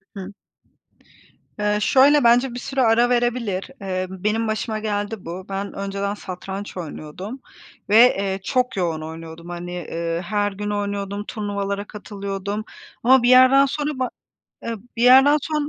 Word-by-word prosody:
Hıı. 195 0 -7 1.3
Eee, 210 0 +1
şöyle, 280 +5 +5
bence 240 +2 +4
bir 245 - -5
süre 270 +1 -2
ara 235 0 +4
verebilir. 240 -5 0
Eee, 185 -1 -2
benim 210 +4 -1
başıma 215 0 -2
geldi 205 -1 -3
bu. 180 +3 -6
Ben 195 +1 -4
önceden 200 0 -3
satranç 190 0 -7
oynuyordum 180 - -7 0.5
ve, 210 - +3 0.2
eee, 195 -1 -2
çok 250 +2 0
yoğun 165 -4 -1
oynuyordum. 160 +1 -9
Hani, 175 0 -6
ııı, 165 0 -2
her 205 +3 -1
gün 205 +1 -5
oynuyordum, 205 0 -3
turnuvalara 200 -2 -3
katılıyordum 200 0 -5 0.4
ama 255 +1 +5
bir 245 - +4
yerden 255 +2 +7
sonra 290 0 -3
ba 255 - 0 0.5
eee, 230 - -3 0.2
bir 235 - 0
yerden 270 +4 +7
sonra 300 0 -2
205 Hz, 145 wpm, -22 LUFS, 190-240 Hz, 1.3 s, yerden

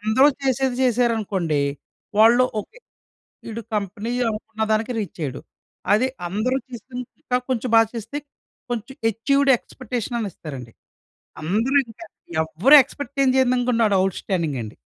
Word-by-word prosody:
అందరూ 220 +7 +4
చేసేది 265 -1 +1
చేశారనుకోండి 215 - +1 0.6
వాళ్ళు 235 +3 +7 0.2
"ఓకే, - - -15 0.7
వీడు 230 +1 -5
కంపెనీ 205 +3 -3 0.2
అనుకున్న 220 0 -6
దానికి 225 +3 +1
రీచైయ్యడు." 155 - -5 0.5
అది 250 +5 +3 0.2
అందరూ 215 +8 0
చేసింది 250 +1 -7 0.2
ఇంకా 250 - 0
కొంచెం 250 -1 -1
బా 225 - +8
చేస్తే 230 +5 -5 0.5
కొంచెం 240 +3 -4
అచీవ్‌డ్ 275 +5 +2
ఎక్స్‌పెక్టేషనని 240 -4 -4
ఇస్తారండి. 130 -7 -8 0.7
అందరూ 220 - 0
ఇంకా 230 +9 -11 0.4
ఎవ్వరు 185 - +5
ఎక్స్‌పెక్ట్ 280 +1 -9
ఏం 265 - +4
చేయందనుకుంటే 250 -2 +2
వాడు 200 -2 +3
అవుట్‌స్టాడింగ్ 175 -6 -1
అండి. 110 - -9
230 Hz, 120 wpm, -22 LUFS, 200-255 Hz, 0.7 s, బా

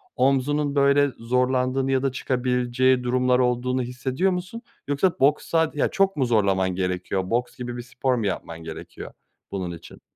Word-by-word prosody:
omzunun, 140 +3 +1
böyle, 140 0 +4
zorlandığını 125 +2 +1
ya 130 0 +1
da 135 - +1
çıkabileceği 125 0 +1
durumlar 125 0 +2
olduğunu 125 +1 +1
hissediyor 130 +9 -1
musun 180 +6 -5 0.3
yoksa 145 +6 +1
boks 140 +3 +3
sad 165 -1 +1
Ya 145 - +1
çok 195 0 +1
mu 135 - +1
zorlaman 100 -5 +2
gerekiyor, 90 0 -2
boks 120 +1 -1
gibi 120 -1 -5
bir 120 - -4
spor 125 +1 -1
mu 115 -3 -2
yapman 85 -4 -4
gerekiyor 80 -1 -8 0.4
bunun 95 -3 -3
için? 85 - -15
125 Hz, 160 wpm, -24 LUFS, 120-140 Hz, 0.4 s, böyle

